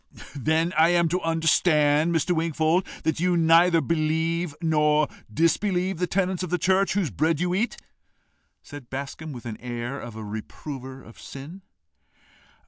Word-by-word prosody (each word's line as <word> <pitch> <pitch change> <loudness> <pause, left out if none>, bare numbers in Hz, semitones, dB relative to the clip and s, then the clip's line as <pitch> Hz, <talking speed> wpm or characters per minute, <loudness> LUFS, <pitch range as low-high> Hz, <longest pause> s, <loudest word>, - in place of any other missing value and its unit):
"Then 160 +5 0
I 160 +2 +5
am 175 -1 +3
to 180 +3 -1
understand, 160 -1 +2
Mr. 170 +2 +1
Wingfold, 165 +2 +1 0.2
that 160 0 0
you 180 0 +2
neither 165 +1 +5
believe 160 0 -1
nor 150 -2 +2 0.2
disbelieve 180 - +1
the 180 - 0
tenets 185 -1 -1
of 180 - -3
the 180 - +1
church 190 +3 +2
whose 190 - 0
bread 155 - 0
you 180 0 0
eat?" 215 +6 -1 0.9
said 145 -5 -11
Bascombe, 140 +3 -6
with 120 - -9
the 115 -3 -5
air 120 +2 -5
of 120 -2 -9
a 110 - -7
reprover 130 +5 -8
of 115 - -15
sin. 150 +8 -10
160 Hz, 150 wpm, -25 LUFS, 145-175 Hz, 0.9 s, I